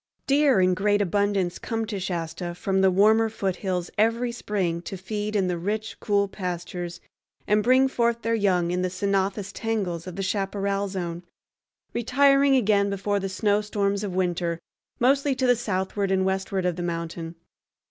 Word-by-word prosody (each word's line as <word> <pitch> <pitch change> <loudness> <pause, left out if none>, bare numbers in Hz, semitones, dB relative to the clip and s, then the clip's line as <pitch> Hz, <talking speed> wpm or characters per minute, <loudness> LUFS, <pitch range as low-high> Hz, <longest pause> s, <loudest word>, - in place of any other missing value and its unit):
Deer 280 -5 +4
in 185 0 +4
great 205 +3 +2
abundance 200 -2 0
come 225 -1 -2
to 210 -2 -4
Shasta 175 -1 -4
from 190 +1 0
the 190 - +5
warmer 215 +4 +4
foothills 190 -4 -2
every 230 +3 +2
spring 190 -7 -2
to 195 - -6
feed 210 +3 -4
in 195 -2 +2
the 180 -2 -1
rich, 215 +4 -3
cool 200 -1 +1
pastures, 175 -2 -5 0.5
and 210 +1 +3
bring 255 +4 +4
forth 235 -3 0
their 230 - 0
young 185 -5 +2
in 180 0 0
the 185 - 0
ceanothus 195 +1 -1
tangles 195 -7 -2
of 180 - -7
the 195 - -3
chaparral 200 0 -1
zone, 175 -3 -4 0.7
retiring 275 +3 +4
again 205 -4 +3
before 200 +1 -1
the 195 0 -3
snowstorms 205 0 0
of 190 -3 -4
winter, 175 -2 0 0.4
mostly 275 +2 +3
to 260 0 0
the 245 -1 +5
southward 200 -3 -2
and 190 0 +2
westward 190 0 -1
of 180 -1 0
the - - -3
mountain. 170 -1 -4
200 Hz, 165 wpm, -25 LUFS, 180-215 Hz, 0.7 s, the